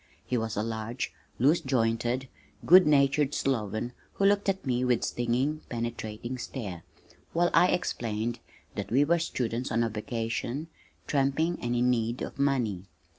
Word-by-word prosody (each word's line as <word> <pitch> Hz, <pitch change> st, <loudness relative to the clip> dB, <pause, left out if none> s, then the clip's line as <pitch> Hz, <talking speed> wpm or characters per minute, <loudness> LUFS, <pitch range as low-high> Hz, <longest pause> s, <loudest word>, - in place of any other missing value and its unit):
He 125 Hz, -, -1 dB
was 110 Hz, -3 st, -1 dB
a 105 Hz, -, +1 dB
large, 115 Hz, +2 st, -3 dB, 0.2 s
loose 145 Hz, +8 st, +4 dB
jointed, 120 Hz, 0 st, 0 dB, 0.4 s
good 185 Hz, -1 st, +8 dB
natured 140 Hz, 0 st, +3 dB
sloven 120 Hz, -2 st, -1 dB, 0.2 s
who 200 Hz, -, 0 dB
looked 200 Hz, 0 st, +3 dB
at 190 Hz, -3 st, -1 dB
me 125 Hz, -1 st, +1 dB
with 125 Hz, -1 st, +2 dB
stinging, 125 Hz, +6 st, 0 dB
penetrating 120 Hz, +1 st, -4 dB
stare, 100 Hz, -11 st, -5 dB, 0.5 s
while 175 Hz, +1 st, +2 dB
I 180 Hz, -, +6 dB
explained 115 Hz, -10 st, -1 dB, 0.3 s
that -, -, -4 dB
we 135 Hz, +5 st, +4 dB
were 170 Hz, +3 st, +3 dB
students 125 Hz, -6 st, -2 dB
on 115 Hz, +1 st, +2 dB
a 115 Hz, -, 0 dB
vacation 115 Hz, +6 st, -3 dB, 0.4 s
tramping 145 Hz, +5 st, +1 dB
and 120 Hz, 0 st, -1 dB
in 125 Hz, +1 st, +3 dB
need 115 Hz, 0 st, -1 dB
of -, -, -7 dB
money. 120 Hz, -10 st, +1 dB
125 Hz, 150 wpm, -29 LUFS, 115-140 Hz, 0.5 s, good